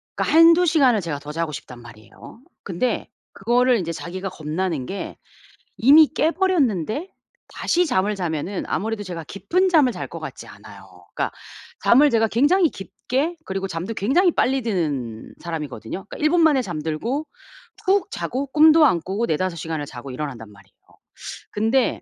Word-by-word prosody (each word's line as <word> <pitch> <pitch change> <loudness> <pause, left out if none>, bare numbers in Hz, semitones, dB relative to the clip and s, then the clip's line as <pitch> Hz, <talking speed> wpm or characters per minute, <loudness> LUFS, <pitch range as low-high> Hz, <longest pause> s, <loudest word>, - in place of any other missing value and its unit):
그러니까 315 - +1
1~2 335 +2 +7
시간을 270 - +3
제가 160 -5 -4
더 145 +1 -8
자고 165 0 -2
싶단 125 -4 -9
말이에요. 110 - -14 0.2
근데 200 +6 -2 0.2
그거를 240 +3 +2
이제 165 -3 -3
자기가 185 +4 -6
겁나는 160 -3 -3
게 195 - -6 0.6
이미 295 +6 +7
깨버렸는데 315 - 0 0.4
다시 355 +1 0
잠을 210 -6 +1
자면은 175 +1 -3
아무래도 220 +1 -2
제가 175 -4 -6
깊은 355 - 0
잠을 295 -8 +4
잘 - - -6
것 - - -8
같지 - - -8
않아요. - - -15
그러니까 - - -2 0.5
잠을 290 +5 +6
제가 225 -2 +2
굉장히 305 - +3
깊게 270 - -3
그리고 195 0 -3
잠도 180 +5 -4
굉장히 335 - +2
빨리 265 -2 +1
드는 145 - -3
사람이거든요. 160 - -6
그러니까 - - -8
1 305 - +2
분 350 +1 +3
만에 295 -5 +4
잠들고 175 - -3 0.6
푹 390 +2 +2
자고 270 +3 -3
꿈도 310 +2 +6
안 175 -11 +2
꾸고 200 +7 -2
4~5 170 +1 -1
시간을 160 -2 -4
자고 130 0 -9
일어난단 125 -6 -6
말이에요. 100 -1 -20 0.8
근데 225 +4 +1
205 Hz, 345 characters per minute, -22 LUFS, -, 0.8 s, 1~2